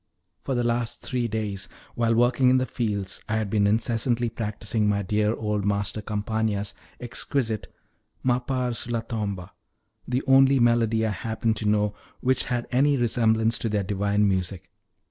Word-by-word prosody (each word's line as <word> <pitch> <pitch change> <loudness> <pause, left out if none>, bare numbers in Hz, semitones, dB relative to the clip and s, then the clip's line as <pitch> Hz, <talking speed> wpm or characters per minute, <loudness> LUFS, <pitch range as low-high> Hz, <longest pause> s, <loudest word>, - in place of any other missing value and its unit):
For 135 - -2
the 120 - +1
last 120 -1 -1
three 125 -2 -1
days, 105 -3 -3 0.2
while 115 -1 +1
working 120 +2 +4
in 130 - +5
the 130 - +1
fields, 105 -7 -3
I 110 - +1
had 105 -3 -2
been 105 -2 +3
incessantly 115 +2 +1
practicing 110 -1 -1
my 100 0 +1
dear 105 +3 +1
old 105 -2 -2
master 100 +1 -1
Campana's 105 -1 -2 0.3
exquisite 120 -2 -2 0.5
M'appar 125 0 0
sulla 115 0 -2
tomba, 100 -6 -4 0.6
the 125 +2 0
only 135 0 +6
melody 115 -2 +3
I 110 - 0
happened 110 +1 -1
to 105 - 0
know 105 0 +2 0.3
which 130 0 +1
had 120 -2 -2
any 140 +3 +3
resemblance 115 -1 +2
to 115 - -1
their 105 -1 0
divine 100 +1 +1
music. 95 -2 -2
110 Hz, 155 wpm, -25 LUFS, 105-120 Hz, 0.6 s, only